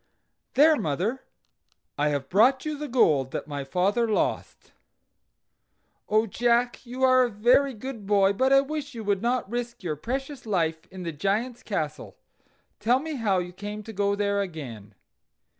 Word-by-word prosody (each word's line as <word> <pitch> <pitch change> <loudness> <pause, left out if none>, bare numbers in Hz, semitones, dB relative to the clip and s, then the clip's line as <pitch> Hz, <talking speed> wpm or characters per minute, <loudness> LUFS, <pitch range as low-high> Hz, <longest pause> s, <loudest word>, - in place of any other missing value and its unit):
"There, 305 +4 +6
mother, 190 - -1 0.7
I 150 +1 +1
have 140 -2 -2
brought 255 - +3
you 305 -1 -2
the 295 +1 -5
gold 155 - +3
that - - -3
my 145 -2 -4
father 195 - +1
lost." 215 - -2 1.4
"Oh, 215 +1 +3
Jack! 240 +3 +1
you 255 +2 -4
are 255 0 +6
a 250 - +2
very 245 +5 +3
good 225 -2 -7
boy, 200 -1 +4
but 260 +6 +1
I 275 0 +7
wish 290 -1 -5
you 225 - -5
would 200 -2 0
not 245 0 0
risk 240 0 -5
your 160 -4 -2
precious 265 - -5
life 165 -5 -1
in 185 -1 -9
the 170 - -3
Giant's 210 - -2
castle. - - -4 0.6
Tell 245 +3 +3
me 310 0 -5
how 210 -5 +1
you 180 0 -3
came 205 +3 -6
to 225 +1 -9
go 200 0 +1
there 200 0 0
again." 125 - -7
215 Hz, 165 wpm, -26 LUFS, 185-255 Hz, 1.4 s, I